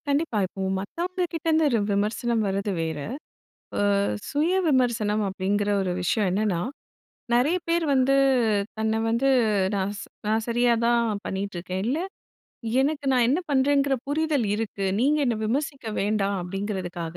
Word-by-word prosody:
கண்டிப்பா. 285 Hz, -4 st, 0 dB
இப்போ 185 Hz, -, -10 dB, 0.2 s
மத்தவங்கக்கிட்டேருந்து 330 Hz, -, -1 dB
ர் 220 Hz, -3 st, +2 dB
விமர்சனம் 220 Hz, +3 st, 0 dB
வர்றது 195 Hz, +1 st, -1 dB
வேற. 160 Hz, -2 st, -3 dB, 0.8 s
ஆ, -, -, +2 dB, 0.5 s
சுய 305 Hz, +4 st, +1 dB, 0.2 s
விமர்சனம் 230 Hz, -6 st, +2 dB
அப்பிடிங்கிற 200 Hz, +2 st, -1 dB
ஒரு 185 Hz, -2 st, -1 dB
விஷயம் 195 Hz, +4 st, +1 dB
என்னன்னா, 195 Hz, -2 st, 0 dB, 0.8 s
நிறைய 275 Hz, +9 st, +3 dB
பேர் 335 Hz, 0 st, +2 dB
வந்து 265 Hz, +1 st, +3 dB, 0.6 s
தன்ன 220 Hz, 0 st, 0 dB
வந்து 235 Hz, +4 st, +2 dB, 0.5 s
"நான் 195 Hz, 0 st, -1 dB
ஸ் -, -, -6 dB, 0.2 s
நான் 220 Hz, +1 st, +1 dB
சரியா 240 Hz, +1 st, +3 dB
தான் 235 Hz, -3 st, +1 dB
பண்ணிக்கிட்டு 195 Hz, 0 st, -4 dB
இருக்கேன். 185 Hz, +2 st, -4 dB
இல்ல 265 Hz, +6 st, 0 dB, 0.8 s
எனக்கு 285 Hz, +1 st, 0 dB
நான் 250 Hz, -2 st, +4 dB
என்ன 280 Hz, +6 st, +2 dB
பண்ணுறேங்கிற 280 Hz, 0 st, +3 dB
புரிதல் 295 Hz, -4 st, 0 dB
இருக்கு. 210 Hz, -2 st, -3 dB, 0.2 s
நீங்க 290 Hz, +4 st, +3 dB
என்னை 235 Hz, -2 st, +1 dB
விமர்சிக்க 275 Hz, +2 st, -2 dB
வேண்டாம்" 200 Hz, -1 st, 0 dB
அப்பிடிங்கிறதுக்காக 180 Hz, -3 st, -4 dB
225 Hz, 135 wpm, -25 LUFS, 200-280 Hz, 0.8 s, நான்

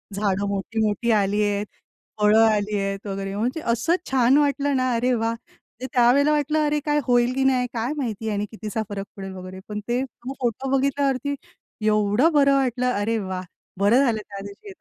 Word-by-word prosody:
झाडं 200 Hz, -1 st, 0 dB
मोठी-मोठी 215 Hz, +3 st, -1 dB
आलीये, 205 Hz, 0 st, +1 dB, 0.6 s
फळं 210 Hz, +1 st, +5 dB
आलीयेत 205 Hz, -2 st, 0 dB
वगैरे, 195 Hz, 0 st, -4 dB
म्हणजे 250 Hz, +9 st, -1 dB
असं 275 Hz, +9 st, +1 dB, 0.2 s
छान 260 Hz, +1 st, +4 dB
वाटलं 285 Hz, -1 st, +1 dB
ना, 255 Hz, 0 st, +1 dB
अरे 250 Hz, +2 st, +1 dB
वाह! 225 Hz, 0 st, 0 dB
म्हणजे 240 Hz, +2 st, -12 dB
त्या 245 Hz, -2 st, +5 dB
वेळेला 285 Hz, +2 st, +3 dB
वाटलं, 300 Hz, +1 st, +1 dB
अरे 295 Hz, 0 st, 0 dB
काय 295 Hz, 0 st, +2 dB
होईल 245 Hz, 0 st, +3 dB
की 265 Hz, 0 st, 0 dB
नाही 255 Hz, -2 st, +2 dB
काय 235 Hz, +4 st, -2 dB
माहिती 225 Hz, -5 st, -3 dB
आणि 205 Hz, 0 st, -1 dB
किती 215 Hz, -1 st, -7 dB
सा 220 Hz, +2 st, -1 dB
फरक 200 Hz, -1 st, -5 dB
पडेल 195 Hz, -1 st, -7 dB
वगैरे. 185 Hz, 0 st, -9 dB
पण 210 Hz, 0 st, -4 dB
ते 245 Hz, +2 st, +1 dB
तो 255 Hz, +1 st, -9 dB
फोटो 255 Hz, +2 st, -2 dB
बघितल्यावरती 275 Hz, 0 st, 0 dB, 0.5 s
एवढं 215 Hz, +9 st, +3 dB
बरं 280 Hz, -2 st, +4 dB
वाटलं. 250 Hz, -2 st, +1 dB
अरे 220 Hz, +2 st, 0 dB
वाह! 185 Hz, -2 st, -4 dB, 0.4 s
बरं 230 Hz, +8 st, +4 dB
झालं 230 Hz, -4 st, +1 dB
त्या 200 Hz, -1 st, -7 dB
दिवशी 385 Hz, -, -11 dB
230 Hz, 180 wpm, -23 LUFS, 205-265 Hz, 0.6 s, फळं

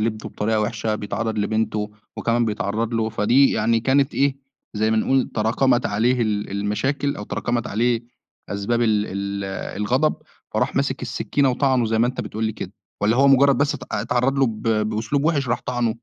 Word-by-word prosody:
لابنه 110 Hz, 0 st, -2 dB
بطريقة 110 Hz, +1 st, 0 dB
وِحشة، 110 Hz, 0 st, -1 dB
بيتعرّض 110 Hz, +1 st, -3 dB
لبنته 105 Hz, 0 st, -1 dB, 0.3 s
وكمان 120 Hz, +1 st, +1 dB
بيتعرّض 110 Hz, +1 st, -2 dB
له، 110 Hz, -1 st, +1 dB
فدي 120 Hz, +5 st, +3 dB
يعني 115 Hz, 0 st, +2 dB
كانت 135 Hz, +3 st, +2 dB
إيه، 140 Hz, -1 st, +2 dB, 0.4 s
زي 110 Hz, +1 st, +1 dB
ما 110 Hz, -, +2 dB
نقول 130 Hz, +4 st, +2 dB
تراكمت 120 Hz, +3 st, +2 dB
عليه 120 Hz, +5 st, +1 dB
ال 105 Hz, -2 st, -1 dB
المشاكل 105 Hz, +8 st, -1 dB
أو 105 Hz, -, -6 dB
تراكمت 120 Hz, +2 st, -2 dB
عليه 115 Hz, +2 st, 0 dB, 0.5 s
أسباب 100 Hz, +4 st, -1 dB
ال 105 Hz, -2 st, +2 dB
ال 100 Hz, 0 st, -4 dB, 0.3 s
الغضب، 130 Hz, +9 st, +1 dB, 0.4 s
فراح -, -, 0 dB
ماسِك -, -, 0 dB
السِّكِّينة 140 Hz, -2 st, 0 dB
وطعنه 130 Hz, -1 st, +2 dB
زي 110 Hz, 0 st, 0 dB
ما 120 Hz, -, +4 dB
أنت 125 Hz, -, -3 dB
بتقول 110 Hz, +1 st, -4 dB
لي 110 Hz, -, 0 dB
كده؟ -, -, -7 dB, 0.3 s
والّا 110 Hz, +3 st, +3 dB
هو 140 Hz, +2 st, +5 dB
مُجرّد 135 Hz, -1 st, +5 dB
بس 145 Hz, 0 st, +1 dB
ات -, -, -8 dB
أ 105 Hz, -, 0 dB
اتعرّض 125 Hz, +4 st, +1 dB
له 135 Hz, -, +4 dB
ب 110 Hz, -2 st, -5 dB
بأسلوب 110 Hz, +5 st, 0 dB
وِحش 145 Hz, -5 st, +1 dB
راح 120 Hz, +1 st, 0 dB
طعنه؟ 120 Hz, -2 st, 0 dB
115 Hz, 185 wpm, -22 LUFS, 105-130 Hz, 0.5 s, هو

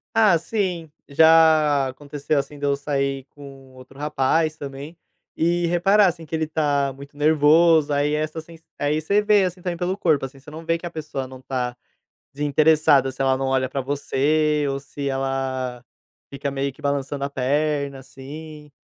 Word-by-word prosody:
Ah 210 Hz, -6 st, +5 dB
sim, 175 Hz, -3 st, -3 dB, 0.2 s
já 155 Hz, -2 st, +5 dB
aconteceu, 145 Hz, +2 st, -3 dB
assim, 145 Hz, +1 st, -3 dB
de 145 Hz, -, -3 dB
eu 140 Hz, 0 st, +2 dB
sair 140 Hz, -1 st, -2 dB
com 135 Hz, -2 st, -13 dB
outro 130 Hz, +1 st, -15 dB
rapaz 150 Hz, +2 st, 0 dB
também. 140 Hz, +3 st, -8 dB, 0.4 s
E 175 Hz, +1 st, +1 dB
reparar 195 Hz, +4 st, +4 dB
assim 165 Hz, -2 st, -3 dB
que 160 Hz, -, -4 dB
ele 160 Hz, 0 st, 0 dB
tá 145 Hz, -3 st, 0 dB
muito 140 Hz, +2 st, -13 dB
nervoso, 155 Hz, +1 st, +4 dB
aí 145 Hz, +1 st, +1 dB
essa 155 Hz, +1 st, -2 dB
sens 165 Hz, 0 st, -15 dB, 0.2 s
aí 145 Hz, +1 st, 0 dB
você 200 Hz, +7 st, +1 dB
vê 210 Hz, -2 st, +4 dB
assim 180 Hz, 0 st, -5 dB
também 175 Hz, -1 st, -3 dB
pelo 180 Hz, +2 st, -2 dB
corpo 155 Hz, -8 st, +1 dB
assim, 135 Hz, +1 st, -11 dB
você 140 Hz, +2 st, -14 dB
não 160 Hz, +2 st, -9 dB
vê 165 Hz, 0 st, +1 dB
que 170 Hz, -, -10 dB
a -, -, -3 dB
pessoa 150 Hz, -4 st, -5 dB
não 130 Hz, 0 st, -12 dB
tá 125 Hz, -2 st, -3 dB, 0.6 s
desinteressada, 150 Hz, -1 st, +3 dB
se 135 Hz, +1 st, -4 dB
ela 135 Hz, 0 st, +3 dB
não 135 Hz, -, -2 dB
olha 130 Hz, -1 st, 0 dB
para 140 Hz, -, -2 dB
você 145 Hz, +2 st, 0 dB
ou 135 Hz, 0 st, -2 dB
se 140 Hz, +1 st, -6 dB
ela 135 Hz, -2 st, -3 dB, 0.5 s
fica 140 Hz, 0 st, -4 dB
meio 140 Hz, 0 st, -2 dB
que 150 Hz, -, -18 dB
balançando 140 Hz, 0 st, -2 dB
a 140 Hz, -, -3 dB
perna 140 Hz, +1 st, -1 dB
assim. 150 Hz, +3 st, -11 dB
145 Hz, 180 wpm, -22 LUFS, 135-160 Hz, 0.6 s, Ah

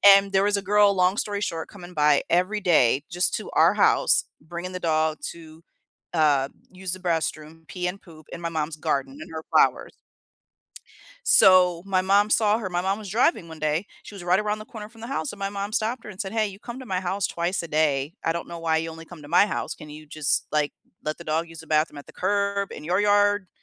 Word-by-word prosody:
And 195 Hz, 0 st, +2 dB
there 195 Hz, 0 st, +3 dB
was 205 Hz, 0 st, +2 dB
a 200 Hz, -, -2 dB
girl, 205 Hz, +1 st, +4 dB
long 185 Hz, +2 st, +2 dB
story 205 Hz, -2 st, -2 dB
short, 165 Hz, -5 st, -3 dB
coming 180 Hz, -3 st, -12 dB
by 150 Hz, -1 st, +4 dB
every 185 Hz, +5 st, +1 dB
day 145 Hz, -7 st, +3 dB
just 175 Hz, +1 st, 0 dB
to -, -, -6 dB
our -, -, +5 dB
house, -, -, +3 dB, 0.2 s
bringing 170 Hz, +4 st, -7 dB
the 180 Hz, -, -4 dB
dog 155 Hz, -2 st, +1 dB
to, 160 Hz, -1 st, -14 dB, 0.5 s
uh, 145 Hz, -4 st, +3 dB, 0.2 s
use 185 Hz, -1 st, -4 dB
the 185 Hz, -, -6 dB
b 180 Hz, -1 st, -3 dB
restroom, 160 Hz, 0 st, -3 dB
pee 180 Hz, -1 st, -3 dB
and 190 Hz, +2 st, -5 dB
poop 155 Hz, -3 st, -16 dB
in 170 Hz, -, -7 dB
my 170 Hz, -, -2 dB
mom's 155 Hz, -1 st, -3 dB
garden 140 Hz, -3 st, -2 dB
and -, -, -10 dB
her 160 Hz, 0 st, -5 dB
flowers. -, -, +3 dB, 1.3 s
So, 180 Hz, -2 st, +6 dB
my 190 Hz, -2 st, +1 dB
mom 200 Hz, +2 st, +3 dB
saw 215 Hz, -1 st, +3 dB
her, 210 Hz, -5 st, -4 dB
my 175 Hz, -1 st, -1 dB
mom 195 Hz, +3 st, -1 dB
was 210 Hz, -, -8 dB
driving 220 Hz, -, +2 dB
one 160 Hz, -, -10 dB
day. 155 Hz, +5 st, -1 dB, 0.2 s
She -, -, -11 dB
was 190 Hz, -3 st, -9 dB
right 180 Hz, +2 st, +3 dB
around 210 Hz, 0 st, -1 dB
the 215 Hz, -, -9 dB
corner 215 Hz, -2 st, -9 dB
from 225 Hz, 0 st, -18 dB
the 230 Hz, -, -7 dB
house, 275 Hz, +2 st, -3 dB
and 205 Hz, -, -12 dB
my 195 Hz, -, -1 dB
mom 200 Hz, +1 st, -4 dB
stopped 230 Hz, +2 st, -1 dB
her -, -, -9 dB
and 190 Hz, -, -11 dB
said, 200 Hz, -2 st, -4 dB
"Hey, 220 Hz, -2 st, +1 dB
you 195 Hz, 0 st, -10 dB
come 240 Hz, +2 st, -8 dB
to 260 Hz, -, -9 dB
my 185 Hz, -4 st, -1 dB
house 190 Hz, +1 st, -1 dB
twice 175 Hz, +2 st, -2 dB
a -, -, -6 dB
day, 150 Hz, -1 st, +1 dB
I 165 Hz, -, +2 dB
don't 170 Hz, -, -5 dB
know 170 Hz, -1 st, -7 dB
why 160 Hz, -1 st, +1 dB
you 165 Hz, +1 st, -2 dB
only 165 Hz, 0 st, -10 dB
come 165 Hz, -2 st, -12 dB
to 145 Hz, -, -12 dB
my 180 Hz, +4 st, +5 dB
house 210 Hz, -, -3 dB
can 150 Hz, -, -12 dB
you 155 Hz, +1 st, -10 dB
just, 150 Hz, -1 st, -1 dB
like, 150 Hz, -1 st, 0 dB, 0.3 s
let 155 Hz, 0 st, -3 dB
the 170 Hz, -, -10 dB
dog 160 Hz, +2 st, -1 dB
use 165 Hz, -1 st, -11 dB
the 160 Hz, -, -16 dB
bathroom 155 Hz, -1 st, +1 dB
at 145 Hz, -, -10 dB
the -, -, -14 dB
curb, 200 Hz, -1 st, 0 dB
in 150 Hz, -, -9 dB
your 180 Hz, +5 st, +1 dB
yard, 205 Hz, -1 st, +3 dB
180 Hz, 245 wpm, -25 LUFS, 160-200 Hz, 1.3 s, So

